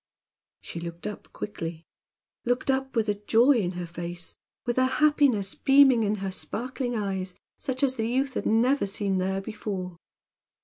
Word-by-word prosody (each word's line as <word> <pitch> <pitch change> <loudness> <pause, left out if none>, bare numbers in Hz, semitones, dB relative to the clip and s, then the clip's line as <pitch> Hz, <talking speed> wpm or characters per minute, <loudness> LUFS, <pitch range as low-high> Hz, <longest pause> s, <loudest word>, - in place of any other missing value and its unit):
She 170 - -6
looked 170 0 -7
up 210 -1 -6
quickly, 165 -5 -6 0.6
looked 245 +2 +1
up 265 0 -2
with 225 -1 +2
a 210 - +2
joy 240 +6 +5
in 185 -4 0
her 175 0 -4
face, 175 +1 -7 0.3
with 240 +1 +1
a 260 - +4
happiness 285 -10 +3
beaming 270 -3 +6
in 210 -1 +1
her 190 - -2
sparkling 245 +5 -3
eyes, 190 -3 -2 0.2
such 260 0 -2
as 260 -1 +2
the 225 0 0
youth 265 +2 0
had - - -2
never 240 +1 +3
seen 195 -1 -1
there 190 +1 0
before. 195 -4 -5
215 Hz, 165 wpm, -27 LUFS, 185-260 Hz, 0.6 s, beaming